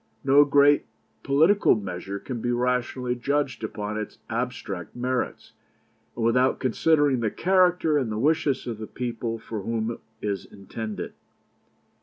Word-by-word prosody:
No 140 +2 +6
great 145 0 +4 0.3
political 160 +9 +4
measure 95 -1 -5
can 120 +2 -6
be 120 - 0
rationally 125 0 0
judged 140 0 -1
upon 105 0 -3
its 105 - -6
abstract 115 -6 -4
merits, 125 +1 -3 0.6
and 115 - -1
without 125 +3 +3
considering 145 +1 +2
the 115 -2 0
character 180 - +3
and 120 -5 -2
the 105 - -2
wishes 145 +1 +1
of 115 -3 -5
the 110 - -6
people 120 -2 -4
for 110 -1 -6
whom 115 +2 -2
it 115 - -7 0.2
is 100 -3 -3
intended. 105 +2 -6
125 Hz, 140 wpm, -25 LUFS, 110-140 Hz, 0.6 s, No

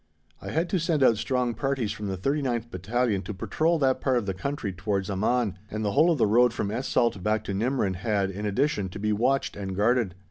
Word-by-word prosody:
I - - -6
had 165 +3 0
to 185 - +1
send 160 -4 +1
out 115 -4 +5
strong 125 0 0
parties 135 -4 -1
from 105 - -5
the 95 -1 -3
39th 120 0 -1
Battalion 105 +2 0
to 100 +2 -6
patrol 160 - +1
that 135 -3 +1
part 130 -2 +2
of 120 - -1
the 95 - -2
country 105 +1 -3
towards 100 +1 -2
Amman, 105 0 0
and 110 0 -3
the 100 - +1
whole 155 +10 +4
of 165 - +2
the 120 - +3
road 120 +3 +4
from 100 - -2
Es 125 +4 -3
Salt 115 -5 +1
back 110 +2 0
to 100 - -4
Nimrin 105 -3 0
had, 100 -1 0
in 105 +2 -4
addition, 105 -2 0
to 90 - -8
be 105 +1 0
watched 130 +6 +1
and 95 -2 -5
guarded. 110 -2 +1
110 Hz, 235 wpm, -26 LUFS, 100-130 Hz, -, out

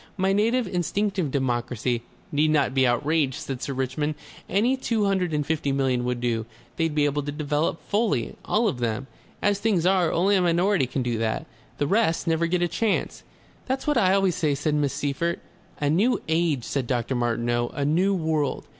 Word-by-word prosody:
"My 190 0 +2
native 230 +5 +2
instinctive 185 -1 -1
democracy 125 -2 -1 0.2
" - - -31
"Need 150 +2 +2
not 145 -4 +2
be 130 -1 +3
outraged," 140 +2 +1
said 135 -2 -5
Sir 140 - -3
Richmond. 135 +4 -1 0.3
"Any 225 +8 +2
two 230 -5 0
hundred 190 -3 +1
and 150 -1 0
fifty 150 -2 -1
million 130 -2 +1
would 125 -1 -1
do, 115 -2 -1 0.3
They'd 165 -2 -1
be 150 -1 +3
able 145 0 0
to 145 +1 -4
develop 150 +2 -1
fully, 205 - 0
all 220 +2 +1
of 160 -12 -2
them. 120 +2 -1 0.4
As 205 -1 +2
things 200 -6 +1
are, 185 -3 +3
only 195 +4 +3
a 190 - +3
minority 175 -2 +2
can 130 +1 -2
do 120 -2 -1
that. 110 -1 -1 0.3
The 145 - 0
rest 195 0 +1
never 165 0 +1
get 175 +1 +1
a - - +2
chance." 220 +4 -1 0.5
"That's 265 +1 -2
what 295 -1 +1
I 190 -6 +4
always 195 -2 +2
say," 150 -3 0
said 145 +2 -1
Miss 145 -2 +1
Seyffert. 155 +5 -1 0.4
"A 145 - 0
New 210 +10 +2
Age," 160 -5 +1
said 135 -1 -2
Dr. 120 0 -1
Martineau; 120 0 0
"a 140 - -3
New 180 +7 +2
World. 155 -5 -1
155 Hz, 195 wpm, -25 LUFS, 130-190 Hz, 0.5 s, I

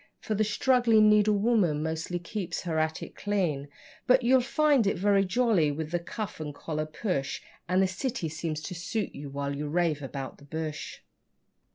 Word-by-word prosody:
For 220 - -3
the 215 +1 +2
struggling 225 -1 +4
needlewoman 210 -6 +3
mostly 160 +2 -2
keeps 175 0 -4
her 165 -3 -1
attic 160 0 -2
clean.) 175 -9 -1 0.4
But 255 0 +5
you'll 255 +2 +5
find 275 -2 +3
it - - +1
very 200 +1 +3
jolly 195 -7 +2
with 155 +2 -4
the 175 - +1
cuff 200 +3 -6
and 150 -2 -5
collar 155 0 -3
push, 155 -4 -2 0.3
And 185 +1 +4
the - - +3
city 190 0 -3
seems 155 0 -4
to 185 - -5
suit 190 +5 -3
you, 140 0 -7
while 140 0 -3
you 150 +1 -3
rave 160 -1 +1
about 135 -1 -6
the 140 - -15
bush. 155 +1 -5
175 Hz, 175 wpm, -28 LUFS, 155-215 Hz, 0.4 s, But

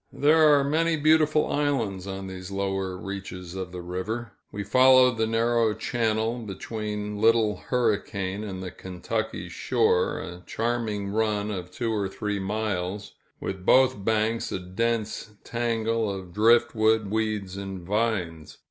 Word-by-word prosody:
There 155 +1 +5
are 140 - +3
many 160 +3 +1
beautiful 155 0 +4
islands 115 -11 -1
on 95 0 -5
these 95 -1 -7
lower 95 -1 -2
reaches 90 -2 -7
of 95 -1 -5
the 90 -1 -7
river. 105 +6 -4 0.2
We 100 - -4
followed 130 +3 +5
the 110 - +2
narrow 115 -1 +2
channel 115 0 -1
between 105 -1 -5
Little 110 -2 +4
Hurricane 105 -5 -1
and 95 -3 -5
the 90 - -5
Kentucky 110 +5 -4
shore, 460 +1 +1
a 90 0 -7
charming 115 -3 -2
run 105 0 0
of 90 -3 -5
two 115 +4 -2
or 100 -3 -1
three 105 +1 -3
miles, 100 -1 -3 0.3
with 95 -1 -5
both 130 -1 +4
banks 110 +1 0
a - - -1
dense 110 +3 -2
tangle 115 -2 -1
of 95 -3 -7
drift 115 +3 +4
wood, 110 -2 +2
weeds 105 -4 -1
and 95 -1 -6
vines. 95 -5 -2
105 Hz, 140 wpm, -26 LUFS, 95-115 Hz, 0.3 s, There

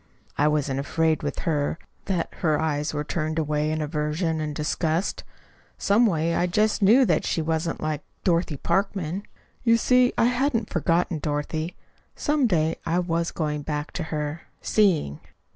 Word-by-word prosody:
I 150 - +3
wasn't 145 -3 0
afraid 160 +3 +1
with 145 -3 -3
her 150 -1 0 0.3
that 180 -4 -1
her 155 -4 +2
eyes 150 -2 0
were 150 -1 -2
turned 155 +1 -2
away 150 -1 0
in 155 0 -1
aversion 155 +2 -1
and 150 -1 -3
disgust. 160 +4 -1 0.5
Some 225 +4 +4
way, 165 -3 +1
I 175 - +1
just 210 +5 +1
knew 230 +7 +6
that - - +2
she - - -1
wasn't 160 +1 -1
like 155 -1 -2 0.2
Dorothy 170 -4 +1
Parkman. 195 0 -1 0.4
You 230 -1 +5
see, 250 +1 +4
I - - +4
hadn't 245 -1 +1
forgotten 170 0 +1
Dorothy. 155 +3 -2 0.4
Some 295 -3 +1
day 160 -5 +1
I 165 +1 0
was 170 -1 0
going 150 -2 -2
back 150 +1 -3
to 175 - -3
her 155 0 -3 0.2
seeing. 170 - +2
160 Hz, 160 wpm, -25 LUFS, 150-185 Hz, 0.5 s, knew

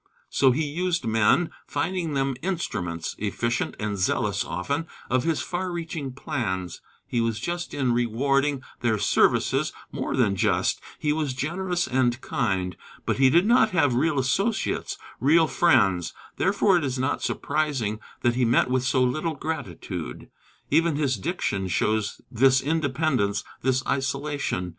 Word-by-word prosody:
So 135 - +4
he 145 +5 +1
used 170 +1 -1
men, 115 +9 +3 0.2
finding 175 -5 -2
them 135 0 +1
instruments 100 - -3
efficient 115 +3 -1
and 105 -2 -2
zealous, 90 - +1
often 140 - -3 0.2
of 130 +2 +2
his 165 -2 0
far 180 +1 -3
reaching 165 -5 -4
plans. 95 -9 -3 0.2
He 120 - -1
was 115 -2 -1
just 175 +7 -3
in 130 -4 0
rewarding 135 +4 +1 0.2
their 115 -3 +1
services - - +2 0.2
more - - -3
than 110 -6 +2
just: 95 - +1 0.2
he 150 -1 0
was 150 -4 -2
generous 175 +6 -1
and 125 -1 +1
kind. 95 -9 -1 0.3
But - - 0
he 130 0 +5
did 170 +7 +4
not 230 -1 +5
have 145 -6 +4
real 150 +4 +1
associates, 140 - 0 0.2
real 160 +6 +5
friends; 100 - +3 0.2
therefore 195 0 +3
it 170 - -1
is 130 -2 -1
not 130 +2 -1
surprising 135 -9 -1 0.2
that 120 - +3
he 125 +1 +1
met 120 +1 +3
with 130 -1 +2
so 130 0 +2
little 155 +6 0
gratitude. 145 - -5 0.4
Even 165 +1 +3
his 140 -3 +1
diction 95 -1 -2
shows 110 +4 0
this 130 +2 +4
independence, 140 -8 0 0.2
this 130 +1 +1
isolation. 140 -8 -1
135 Hz, 145 wpm, -25 LUFS, 115-160 Hz, 0.4 s, he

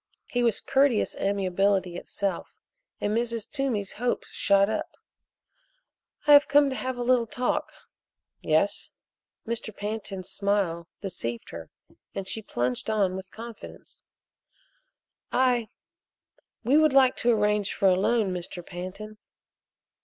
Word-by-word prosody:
He 245 - -1
was 230 -3 +2
courteous 270 -4 +2
amiability 195 -1 +1
itself, 190 +1 -4 0.4
and 205 +1 0
Mrs. 235 -1 0
Toomey's 250 -9 -1
hopes 245 +2 -2
shot 200 0 +3
up. 215 0 -2 1.4
"I 290 -1 +9
came 285 -1 +3
to - - -3
have 260 -1 -3
a 245 - -2
little 240 -1 +3
talk." 250 +3 -1 0.7
"Yes?" - - +1 0.6
Mr. 230 -1 -4
Pantin's 205 -3 -5
smile 195 -5 -1
deceived 120 - -5
her 85 -1 -8 0.5
and 195 -1 -4
she 220 - -3
plunged 125 - -2
on 200 -4 +1
with 190 0 -7
confidence: 230 +2 -11 1.3
"I 245 -3 +2 0.9
we 260 +6 +4
would 310 -3 +4
like 265 -2 +5
to 240 - +1
arrange 210 -2 +1
for 195 - +2
a 185 - +5
loan, 205 0 +1
Mr. 175 0 -6
Pantin." 195 +4 -8
210 Hz, 125 wpm, -27 LUFS, 190-240 Hz, 1.4 s, I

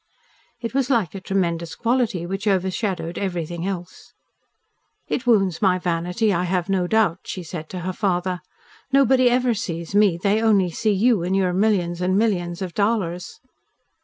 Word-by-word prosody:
It 230 0 -4
was 270 -1 0
like 225 - +1
a 195 - -7
tremendous 170 -4 -1
quality 235 -7 0
which 195 +4 -4
overshadowed 190 -2 -1
everything 175 -2 -3
else. 180 -2 -7 0.9
"It 250 - -3
wounds 195 -7 +3
my 185 -3 +3
vanity, 180 +5 0
I 180 0 0
have 180 0 -1
no 185 -2 +1
doubt," 205 -4 +2
she 185 - -5
had 170 - -11
said 160 -2 -7
to 185 - -5
her 185 +2 -3
father. 180 -2 -1 0.5
"Nobody 265 -2 +4
ever 250 0 +2
sees 170 -5 -5
me, 205 -4 +4
they 200 +4 +1
only 200 -5 +3
see 215 +6 -1
you 210 0 +3
and 180 +3 -1
your 185 -2 +1
millions 180 -3 +1
and 185 +1 +1
millions 185 -5 0
of 180 -2 -6
dollars." 200 -5 -1
190 Hz, 165 wpm, -22 LUFS, 175-215 Hz, 0.9 s, Nobody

